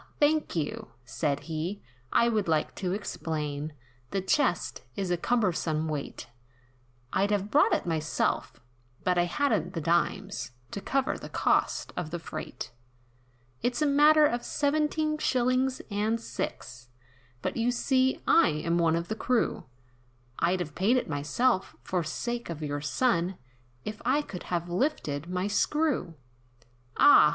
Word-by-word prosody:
thank 300 -4 +2
you," 155 -3 -2 0.2
said 140 +3 -1
he, 165 +5 -3 0.3
"I 235 - +4
would 215 -5 +1
like 160 -2 +1
to 185 -2 -1
explain, 155 -6 -3 0.4
The 195 - -1
chest, 190 - +1
is 190 -2 -2
a - - +4
cumbersome 170 -7 0
weight, 150 -3 -4 0.9
I'd 195 +2 +2
have 205 0 0
brought 295 - +5
it - - +1
myself; 150 -7 -1 0.4
but 180 -1 +2
I 175 - +4
hadn't 190 - 0
the - - 0
dimes, 155 -6 0 0.2
To 200 - -4
cover 270 +4 0
the - - -8
cost - - +1
of 175 -3 -3
the 175 - -3
freight. 155 -2 -7 0.9
"It's 245 +5 0
a - - +3
matter 300 +2 +6
of 240 -4 0
seventeen 305 +1 0
shillings 255 0 +1
and 215 +3 +1
six, 125 - -6 0.5
But - - -1
you 235 +1 +1
see, 260 +1 +1
I 335 - +6
am 160 +3 0
one 165 -1 +3
of 170 +1 -2
the - - -2
crew, 245 +1 0 0.7
I'd 180 +1 +2
have 155 -4 -5
paid 210 - +3
it 250 - -1
myself, 185 - +1
for 180 -2 -1
sake 240 +8 -3
of 160 -2 -5
your 145 -1 -2
son, 180 - +1 0.5
If 215 +1 -5
I 275 +5 +2
could 180 -10 -8
have 175 -1 -1
lifted 175 - -1
my 180 +1 -1
screw." 260 - +1 0.8
"Ah! 220 - +8
185 Hz, 145 wpm, -28 LUFS, 160-250 Hz, 0.9 s, Ah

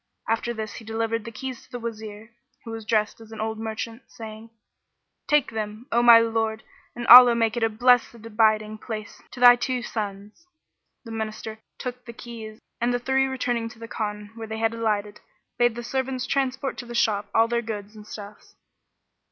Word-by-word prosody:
After 225 +1 0
this 220 -2 -5
he - - -10
delivered 225 0 -2
the 230 - -6
keys 255 +2 -6
to - - -24
the 245 - -5
Wazir, 220 -1 -7 0.3
who 225 - -6
was 225 -1 -7
dressed 215 0 0
as 225 0 -14
an 220 - -9
old 220 0 -3
merchant, 225 +2 -5
saying, 220 0 -10 0.8
"Take 295 -5 +3
them, 215 +1 -5
O 235 - +3
my 235 -1 +9
lord, 225 -1 -1 0.3
and 240 0 -5
Allah 245 0 +10
make 225 -1 +1
it 240 - -2
a 225 - +3
blessed 245 +2 +3
abiding 215 -1 +1
place 215 -2 -7
to 250 - -11
thy 245 0 +9
two 245 0 -2
sons!" 210 - -6 0.6
The 230 - -8
Minister 220 0 -5 0.2
took 250 -1 -6
the 235 - -9
keys 225 -2 -9 0.2
and 240 +1 +1
the 245 - +1
three 265 +2 +2
returning 245 -3 -2
to 225 - -15
the 230 0 -9
Khan 210 -2 -4
where 225 -1 -8
they 220 0 -5
had 225 0 +1
alighted, 210 -2 -2 0.4
bade 240 -1 +3
the 240 - -6
servants 260 +1 -2
transport 265 0 -1
to 245 - -7
the 240 - -7
shop 210 -3 +1
all 225 0 +5
their 235 0 0
goods 210 -2 -6
and 210 0 -12
stuffs. 205 -1 -11
225 Hz, 195 wpm, -25 LUFS, 215-240 Hz, 0.8 s, Allah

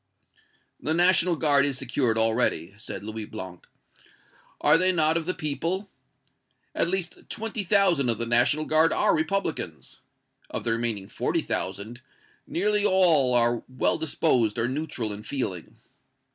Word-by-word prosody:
"The 155 - -1
National 175 0 +3
Guard 145 -3 +4
is 140 -2 -1
secured 120 -2 -1
already," 110 -6 +1
said 110 - -7
Louis 110 0 -6
Blanc. 95 -5 -9 0.9
"Are - - +4
they 185 +3 +3
not 160 -2 +2
of 165 0 -2
the 185 - -2
people? 170 +5 -3 0.8
At - - +2
least 180 -1 -4
twenty 225 -1 -3
thousand 180 -9 +2
of 115 - +1
the 115 - -3
National 120 +6 +2
Guard 155 +1 +4
are - - +2
Republicans. 160 - -3 0.5
Of - - -5
the 115 - 0
remaining 115 -4 -2
forty - - -2
thousand, 100 +6 -4 0.5
nearly 210 +3 0
all 170 -10 +4
are 120 -1 +2
well 130 +4 -1
disposed 125 -8 0
or 115 - 0
neutral 130 -5 -4
in 100 - -8
feeling. 100 - -5
140 Hz, 145 wpm, -25 LUFS, 115-170 Hz, 0.9 s, Guard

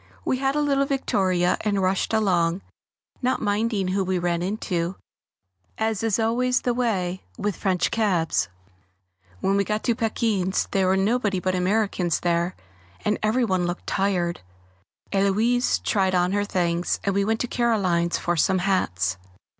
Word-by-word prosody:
We 260 - +1
had 270 +1 0
a 300 - +2
little 275 -1 +2
victoria 185 -10 +1
and 205 -2 0
rushed 190 0 0
along, 185 -5 +1 0.6
not 255 0 +1
minding 205 -2 0
who 195 +1 +1
we 185 0 0
ran 175 -1 0
into, 180 -2 -2 0.8
as 220 -2 -1
is 225 -3 +1
always 245 +3 +1
the 245 - 0
way 190 -7 -1 0.2
with 205 -2 -2
French 185 -2 0
cabs. 170 - +1 0.9
When 195 +1 +2
we 200 - +3
got 210 +2 -2
to 235 - +2
Paquin's 215 -4 0
there 190 -1 +2
were 190 +1 +3
nobody 205 -1 +1
but 185 +1 -1
Americans 185 -2 0
there, 175 +1 0 0.5
and 210 - +1
every 225 +4 +2
one 185 -4 0
looked 175 +1 -4
tired. 180 -3 0 0.7
Héloise 215 +5 +2
tried 190 -3 +1
on 180 0 +2
her 205 +1 0
things, 175 -3 0
and 200 - 0
we 200 +1 +2
went 220 +2 0
to 245 - -1
Caroline's 190 -9 +1
for 175 - -1
some 185 +3 +2
hats. 95 - 0
195 Hz, 155 wpm, -24 LUFS, 180-220 Hz, 0.9 s, we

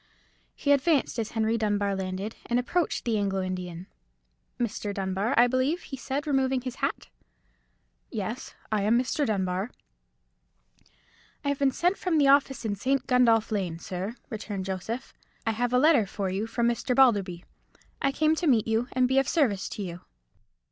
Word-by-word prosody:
He 285 - 0
advanced 280 -3 +2
as 220 - -3
Henry 225 0 +1
Dunbar 205 -2 0
landed, 190 +3 -4
and 240 - +1
approached 325 +8 0
the 225 -3 +1
Anglo 195 -2 0
Indian. 180 -1 -5 0.7
"Mr. 215 -3 -2
Dunbar, 195 +5 -1
I 240 - +8
believe?" 255 +7 +1
he 270 - -7
said, 270 +2 -3
removing 265 -3 +1
his 255 0 -6
hat. - - -2 1.0
"Yes, 220 +2 -5 0.2
I 215 -1 +1
am 215 +4 +3
Mr. 255 +3 0
Dunbar." 190 0 -1 1.8
"I - - +2
have 285 - -1
been 280 -1 +4
sent 355 +8 0
from 355 -3 +1
the 280 -2 +5
office 275 -3 +3
in 210 - 0
St. 260 +6 0
Gundolph 235 -4 +3
Lane, 185 -6 -1
sir," 185 +6 -5 0.2
returned 205 -3 -4
Joseph; 195 +6 -4 0.3
"I 225 - +2
have 240 +2 -1
a 250 - +3
letter 275 -6 +5
for 195 -1 -3
you 200 +4 -2
from 235 +1 0
Mr. 240 +1 0
Balderby. 200 -9 +3 0.6
I 275 - +2
came 310 +2 +2
to 345 - 0
meet 230 -6 +3
you, 225 +2 +1
and 255 - +2
to - - +5
be 265 +1 +3
of 270 - 0
service 220 - +1
to 205 - -5
you." 175 -1 -6
230 Hz, 175 wpm, -27 LUFS, 200-265 Hz, 1.8 s, I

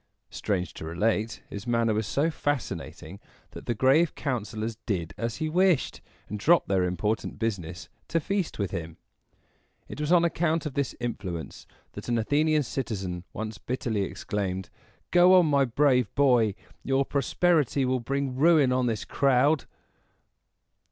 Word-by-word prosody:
Strange 90 -5 -2
to - - -9
relate, 105 +7 -1
his 100 +3 -7
manner 115 -2 +2
was 110 -1 -1
so 150 +8 +1
fascinating 125 - -4 0.3
that - - -11
the 120 - 0
grave 135 +8 +3
councilors 110 -4 -3
did 85 -7 -2
as 115 -1 -3
he 155 - -2
wished, 180 -1 +2 0.3
and 105 - -5
dropped 165 +9 +4
their 95 -2 +2
important 90 +5 -2
business 90 -7 -3 0.2
to 165 - +1
feast 195 +2 -2
with 100 -3 -2
him. 80 -1 -5 0.9
It - - -7
was 150 +2 -1
on 175 -1 +5
account 165 -1 0
of 150 - -4
this 140 -1 -2
influence 95 - -5 0.2
that - - -8
an 120 - +2
Athenian 150 +6 +2
citizen 95 -10 -4
once 110 0 -6
bitterly 120 -4 -2
exclaimed, 95 -1 -3 0.4
"Go 180 +1 +7
on, 180 -2 +6
my 140 -3 +3
brave 125 -2 +2
boy! 125 -7 +3 0.3
Your 135 0 +1
prosperity 145 0 +1
will 130 0 +1
bring 135 +2 -2
ruin 150 -2 +4
on 125 -1 +1
this 110 -3 -2
crowd." 140 +2 +2
125 Hz, 150 wpm, -27 LUFS, 105-145 Hz, 0.9 s, Go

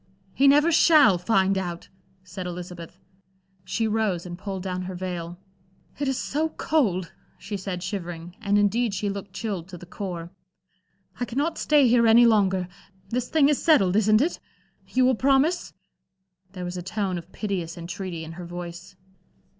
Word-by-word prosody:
"He 275 - +4
never 295 +4 +5
shall 305 - +6
find 190 0 +2
out," 175 -2 -5 0.4
said 185 0 -7
Elizabeth. 175 -1 -8 0.7
She 225 +4 -1
rose 210 -5 0
and 175 -1 -6
pulled 190 0 -6
down 185 -1 -3
her 185 0 -6
veil. 175 -1 -5 0.6
"It 285 - -1
is 265 -1 0
so 310 +3 -1
cold," 205 - 0 0.3
she 205 - -6
said 185 -2 -5
shivering, 175 -2 -6
and 205 -1 +2
indeed 205 +1 +1
she 200 +2 -1
looked 200 0 -7
chilled 195 -7 -4
to 185 -1 -9
the 175 - -11
core. 175 -3 -6 0.9
"I 245 - 0
cannot 285 +8 -2
stay 295 -3 +4
here 235 -1 +4
any 235 +2 +7
longer. 190 -5 +3 0.4
This 245 +2 -2
thing 305 -3 +4
is 295 -2 +1
settled, 200 - +4
isn't 215 +1 +4
it? 325 +5 -1 0.5
You 255 0 +2
will 260 - +4
promise?" 275 +8 +2 0.8
There 180 -2 -6
was 175 +1 -5
a - - -4
tone 190 -1 -2
of 170 +2 -14
piteous 180 -6 -4
entreaty 170 0 -6
in 160 - -8
her 175 +1 -8
voice. 175 +1 -8
195 Hz, 165 wpm, -25 LUFS, 180-235 Hz, 0.9 s, any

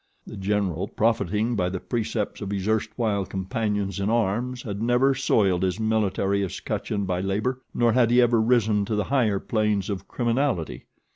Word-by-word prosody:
The - - -9
General, 95 -3 -1
profiting 110 +1 0
by 90 -3 0
the 95 0 -4
precepts 105 +3 -3
of 100 - -4
his 100 -1 -3
erstwhile 110 -1 0
companions 100 0 -2
in 100 +1 0
arms, 120 +3 0
had 100 -2 -5
never 125 +4 +3
soiled 100 -9 +2
his 95 +2 0
military 100 -3 +1
escutcheon 100 +2 -3
by 90 -1 -1
labor, 110 +7 -1
nor 120 -1 +2
had 125 -2 +4
he 120 +1 +4
ever 120 -2 +4
risen 110 -3 +2
to 110 - -2
the 105 - +1
higher 110 -7 +3
planes 105 -3 0
of 95 - -5
criminality. 120 - -1
105 Hz, 165 wpm, -25 LUFS, 95-115 Hz, -, had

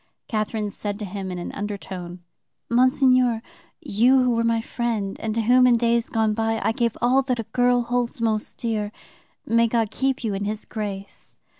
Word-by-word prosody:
Catherine 215 -1 -2
said 205 0 -4
to 210 - -5
him 195 0 -5
in 180 - -4
an 175 - -5
undertone: 185 -4 -6 0.5
"'Monseigneur, 255 -1 +3 0.4
you 255 -1 +3
who 250 - +2
were 230 0 +1
my 230 0 +2
friend, 225 -4 -2
and 220 -1 -3
to 230 - +1
whom 250 +3 +5
in 245 - +5
days 235 0 +1
gone 220 -2 +1
by 225 0 0
I - - +2
gave 235 0 -1
all 255 +3 +4
that 255 -2 -1
a - - -1
girl 245 -1 +3
holds 240 0 -2
most 220 -2 -1
dear, 215 -3 -2 0.5
may 230 0 +3
God 225 -2 0
keep 265 -1 -1
you 220 -3 -1
in 200 +1 -3
His 215 +1 -4
grace! 200 -3 -7
225 Hz, 185 wpm, -23 LUFS, 210-245 Hz, 0.5 s, whom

